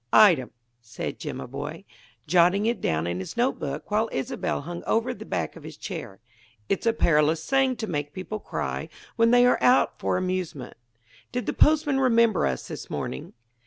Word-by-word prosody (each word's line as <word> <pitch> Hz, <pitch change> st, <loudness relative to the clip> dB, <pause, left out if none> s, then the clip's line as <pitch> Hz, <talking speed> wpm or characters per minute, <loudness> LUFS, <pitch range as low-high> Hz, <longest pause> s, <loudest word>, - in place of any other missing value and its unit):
"Item," 175 Hz, -, +6 dB, 0.3 s
said 115 Hz, 0 st, -6 dB
Jimaboy, -, -, -6 dB, 0.4 s
jotting 180 Hz, +5 st, +4 dB
it 235 Hz, 0 st, 0 dB
down 80 Hz, +1 st, 0 dB
in 85 Hz, +1 st, -2 dB
his 95 Hz, -, -7 dB
notebook 170 Hz, -, -1 dB
while 220 Hz, +2 st, +2 dB
Isobel 135 Hz, -, -2 dB
hung 170 Hz, +4 st, -7 dB
over 230 Hz, +3 st, +1 dB
the -, -, -10 dB
back 85 Hz, -4 st, -2 dB
of -, -, -11 dB
his -, -, -10 dB
chair: 95 Hz, -, -7 dB, 0.5 s
"It's 195 Hz, +4 st, -1 dB
a 230 Hz, -, +4 dB
perilous 155 Hz, -4 st, +2 dB
thing 270 Hz, -1 st, +3 dB
to 220 Hz, -, -4 dB
make 145 Hz, -6 st, -3 dB
people 190 Hz, +5 st, -5 dB
cry -, -, -4 dB, 0.3 s
when 230 Hz, -1 st, +4 dB
they 245 Hz, +1 st, +6 dB
are 250 Hz, -, +3 dB
out 250 Hz, +1 st, +4 dB
for -, -, 0 dB
amusement. 185 Hz, -8 st, -3 dB, 0.6 s
Did 245 Hz, 0 st, -2 dB
the -, -, -1 dB
postman 295 Hz, -3 st, +3 dB
remember 230 Hz, -, +3 dB
us 65 Hz, -2 st, -3 dB
this -, -, -7 dB
morning?" 65 Hz, -, -5 dB
185 Hz, 170 wpm, -26 LUFS, 145-235 Hz, 0.6 s, Item